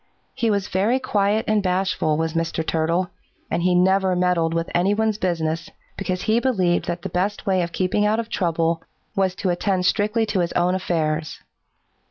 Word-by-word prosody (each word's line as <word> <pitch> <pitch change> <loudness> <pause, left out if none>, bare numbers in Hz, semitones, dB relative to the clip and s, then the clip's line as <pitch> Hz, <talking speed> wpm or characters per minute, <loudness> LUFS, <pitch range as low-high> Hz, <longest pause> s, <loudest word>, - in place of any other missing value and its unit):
He 230 - 0
was 200 -2 0
very 205 +7 +1
quiet 210 -4 +1
and 215 -1 +2
bashful, 185 -4 0
was 160 0 -1
Mr. 165 -1 -1
Turtle, 165 +3 0 0.4
and 170 - 0
he 180 +1 +2
never 190 +1 +3
meddled 180 -2 +1
with 165 0 -1
any 185 +4 +2
one's 220 -1 0
business, 165 -1 -1 0.3
because 185 -2 -3
he 220 +2 +2
believed 190 -9 +1
that 175 0 -4
the - - -3
best 195 +4 -1
way 190 -2 +2
of 170 0 -3
keeping 185 +4 0
out 215 +2 +2
of 230 - -3
trouble 165 -4 0 0.3
was 190 -2 +1
to 185 -2 -1
attend 185 +1 0
strictly 215 +4 +2
to 205 -3 -1
his 175 -1 0
own 175 +1 +2
affairs. 160 -4 -1
185 Hz, 185 wpm, -22 LUFS, 170-205 Hz, 0.4 s, never